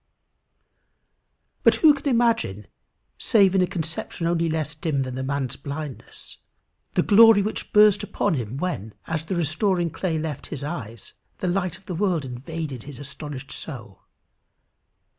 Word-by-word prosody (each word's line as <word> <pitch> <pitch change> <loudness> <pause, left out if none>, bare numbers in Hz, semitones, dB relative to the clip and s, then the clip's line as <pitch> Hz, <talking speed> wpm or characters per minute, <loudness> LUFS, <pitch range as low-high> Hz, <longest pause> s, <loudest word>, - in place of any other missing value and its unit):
But - - +5
who 310 -2 +6
can 285 0 -3
imagine, 230 - +1 0.5
save 200 -4 +4
in 190 - +4
a 180 - +3
conception 165 0 -3
only 170 0 +1
less 155 -1 -2
dim 155 -3 -1
than 130 -1 -5
the 130 - -4
man's 135 -1 -2
blindness, 140 0 -7 0.6
the - - +3
glory 220 -1 +7
which 215 - -4
burst 210 -1 +6
upon 205 - -1
him 125 -3 -3
when, 125 - -3
as 160 -1 -3
the 185 - -2
restoring 175 +2 +1
clay 170 -1 -2
left 155 -3 -4
his 145 -3 -6
eyes, 115 -8 -6 0.2
the 185 - -3
light 180 -1 -1
of 190 - -24
the 185 - -5
world 175 -4 0
invaded 135 +1 -5
his 140 0 -9
astonished 140 -1 -8
soul? 120 -10 -8
160 Hz, 150 wpm, -24 LUFS, 140-185 Hz, 0.6 s, glory